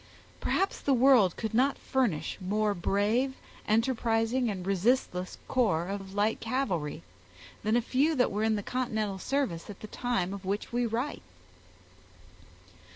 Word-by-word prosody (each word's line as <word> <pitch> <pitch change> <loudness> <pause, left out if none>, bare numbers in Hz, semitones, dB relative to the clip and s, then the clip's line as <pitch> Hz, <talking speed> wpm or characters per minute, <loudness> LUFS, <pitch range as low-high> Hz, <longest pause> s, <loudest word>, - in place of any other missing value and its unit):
Perhaps 390 - 0
the 275 - +2
world 245 -8 +5
could 220 -1 -3
not 265 +4 +3
furnish 245 -12 -1
more 210 +3 +1
brave, 210 +8 +1 0.3
enterprising, 230 +1 +1
and 185 -3 -4
resistless 195 -2 0
corps 190 -9 +1
of 195 -1 -5
light 210 +2 +1
cavalry, 215 - -2 0.6
than 215 +2 +1
a 240 - +2
few 285 +6 +2
that 250 - +2
were 205 +2 -1
in 220 0 +2
the 205 - -3
continental 220 -6 -2
service 235 -10 -2
at 205 - -9
the - - -6
time 200 -5 -1
of 200 -1 -7
which 200 +4 -3
we 240 0 +1
write. 240 +6 -2
220 Hz, 145 wpm, -29 LUFS, 195-255 Hz, 0.6 s, world